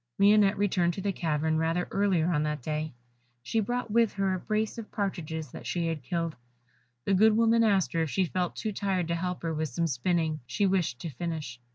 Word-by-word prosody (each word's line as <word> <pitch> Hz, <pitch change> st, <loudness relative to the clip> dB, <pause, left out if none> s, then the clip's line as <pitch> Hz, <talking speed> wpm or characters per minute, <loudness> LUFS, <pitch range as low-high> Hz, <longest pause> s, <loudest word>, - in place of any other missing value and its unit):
Lionette 205 Hz, 0 st, +5 dB
returned 180 Hz, -4 st, +1 dB
to 195 Hz, -, -4 dB
the 200 Hz, -, 0 dB
cavern 160 Hz, -3 st, 0 dB
rather 165 Hz, +2 st, 0 dB
earlier 185 Hz, -4 st, +2 dB
on 150 Hz, -3 st, +1 dB
that 150 Hz, -3 st, -2 dB
day; 155 Hz, +1 st, -2 dB, 0.5 s
she 225 Hz, -, 0 dB
brought 240 Hz, +1 st, -2 dB
with 230 Hz, -1 st, +3 dB
her 195 Hz, -1 st, 0 dB
a 185 Hz, -, -2 dB
brace 215 Hz, +3 st, -1 dB
of 220 Hz, -, -9 dB
partridges 160 Hz, -, -3 dB
that -, -, -8 dB
she 175 Hz, -1 st, -1 dB
had 165 Hz, -3 st, -2 dB
killed. 165 Hz, +4 st, -2 dB, 0.7 s
The 200 Hz, -, +2 dB
good 215 Hz, +3 st, +5 dB
woman 230 Hz, 0 st, +4 dB
asked 200 Hz, -4 st, +2 dB
her 165 Hz, -, +1 dB
if 160 Hz, -, 0 dB
she 190 Hz, +6 st, +1 dB
felt 180 Hz, 0 st, -2 dB
too 215 Hz, -, -3 dB
tired 195 Hz, -4 st, -1 dB
to 170 Hz, -, +1 dB
help 180 Hz, +1 st, -3 dB
her 165 Hz, -1 st, -1 dB
with 155 Hz, 0 st, -2 dB
some 165 Hz, +7 st, -1 dB
spinning 160 Hz, +2 st, 0 dB
she 200 Hz, +11 st, 0 dB
wished 185 Hz, -10 st, +1 dB
to 165 Hz, -, -4 dB
finish. 150 Hz, -4 st, -5 dB
175 Hz, 215 wpm, -29 LUFS, 160-200 Hz, 0.7 s, Lionette